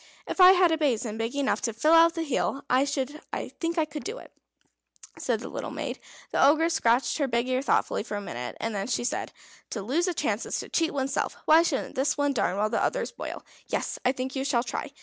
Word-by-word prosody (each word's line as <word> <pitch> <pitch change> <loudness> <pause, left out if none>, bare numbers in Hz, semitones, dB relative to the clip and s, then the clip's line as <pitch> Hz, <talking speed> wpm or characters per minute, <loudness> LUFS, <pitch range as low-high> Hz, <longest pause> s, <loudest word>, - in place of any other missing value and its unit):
"If - - 0
I 365 +1 +10
had 360 -2 +4
a 320 - +1
basin 230 -7 0
big 230 +4 -2
enough 280 -1 0
to 230 - -1
fill 305 +9 +3
out 330 +1 +6
the 330 - -1
heel, 275 -1 -1
I 260 +2 +4
think 295 +4 -4
I 320 - +3
could 300 -1 -7
do 440 +5 -5
it," - - -13 0.9
said - - -1
the - - -6
little - - -5
maid. - - -5 0.3
The - - +3
Ogress 320 +4 +4
scratched 245 0 +2
her 285 - +1
big 235 0 0
ear 255 0 0
thoughtfully 275 - +1
for 210 -1 -5
a - - -4
minute, 125 -10 -6
and 225 - -2
then 200 -1 -3
she 240 -1 -1
said: 240 - -2 0.4
"To 210 - -4
lose 310 - 0
a 360 - -1
chance 220 -8 -1
is - - -2
to - - -10
cheat 330 -1 +1
oneself. 270 -1 -2
Why 315 +2 +7
shouldn't 315 -5 -1
this 275 +3 0
one 285 -1 +1
darn 190 -7 0
while 215 +1 0
the - - +1
others - - -1
boil? - - -7 0.2
Yes, - - -2
I 250 - +3
think 260 0 -5
you 265 - -1
shall 260 -4 +1
try. 255 +4 -4
275 Hz, 235 wpm, -27 LUFS, 235-315 Hz, 0.9 s, I